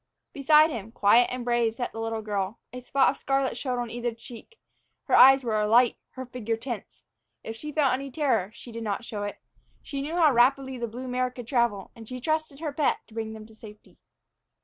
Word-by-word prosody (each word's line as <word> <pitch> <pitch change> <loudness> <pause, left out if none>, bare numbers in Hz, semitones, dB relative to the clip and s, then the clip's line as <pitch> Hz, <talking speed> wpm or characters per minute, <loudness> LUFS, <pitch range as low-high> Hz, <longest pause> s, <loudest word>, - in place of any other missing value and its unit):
Beside 305 +3 +5
him, 225 -3 -6
quiet 230 +2 +4
and 250 -1 -4
brave, 240 -2 +1
sat 245 +1 -4
the 225 - -8
little 225 -1 -3
girl. 205 0 -3 0.2
A 250 - -7
spot 265 +2 +2
of 275 - -11
scarlet 270 -1 0
showed 255 -3 -3
on 240 -2 -3
either 240 0 -2
cheek, 235 - -13 0.5
her - - -4
eyes 270 +1 +8
were 215 -3 0
alight, 230 +3 +4 0.2
her 260 0 -7
figure 230 -3 -3
tense. 230 -3 -7 0.4
If 225 - -6
she 300 +6 -7
felt 285 -4 +2
any 275 +2 -3
terror, 250 -9 0
she 235 - -12
did 230 0 -7
not 210 +2 -3
show 215 -4 -5
it. 205 0 -5 0.4
She 280 -2 -5
knew 305 +4 -4
how 320 -5 +4
rapidly 265 +1 +2
the 235 - -2
blue 245 +4 -7
mare 255 0 0
could 245 -1 -10
travel, 235 -6 0
and 225 -2 -12
she 255 0 -6
trusted 310 +1 -2
her 305 -3 -3
pet 295 -1 +1
to - - -17
bring 220 -1 -4
them 215 -1 -10
to 220 - -17
safety. 215 -1 -15
245 Hz, 215 wpm, -26 LUFS, 225-270 Hz, 0.5 s, eyes